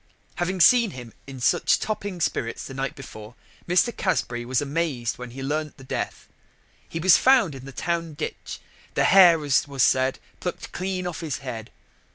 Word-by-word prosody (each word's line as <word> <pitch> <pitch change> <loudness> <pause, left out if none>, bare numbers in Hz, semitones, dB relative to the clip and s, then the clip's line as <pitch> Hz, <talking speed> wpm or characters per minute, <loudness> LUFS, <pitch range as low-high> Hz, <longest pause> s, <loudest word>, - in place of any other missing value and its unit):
] - - -35
Having 185 +1 -1
seen 235 +3 +6
him 120 -3 -9
in 135 -1 -8
such 120 - +2
topping 205 -4 -4
spirits 115 -6 -2
the 135 - -8
night 135 0 -3
before, 110 -4 -11 0.3
Mr. 185 +6 +2
Casbury 120 - -1
was 125 0 0
amaz'd 145 -5 -2
when 125 -1 -7
he 135 +3 -8
learn'd 150 +2 -2
the 135 - -13
death. 130 - -4 0.6
He - - -5
was 185 +2 +6
found 255 - +4
in 135 -1 -10
the 135 - -8
town 165 +2 -3
ditch, - - -6 0.4
the - - +3
hair 175 -5 +6
as 140 0 +2
was 140 -2 0
said 130 0 +2 0.2
pluck'd 180 - -5
clean 185 0 -3
off 175 -3 -4
his 160 -5 -3
head. 115 -3 -6
145 Hz, 185 wpm, -24 LUFS, 130-180 Hz, 0.6 s, seen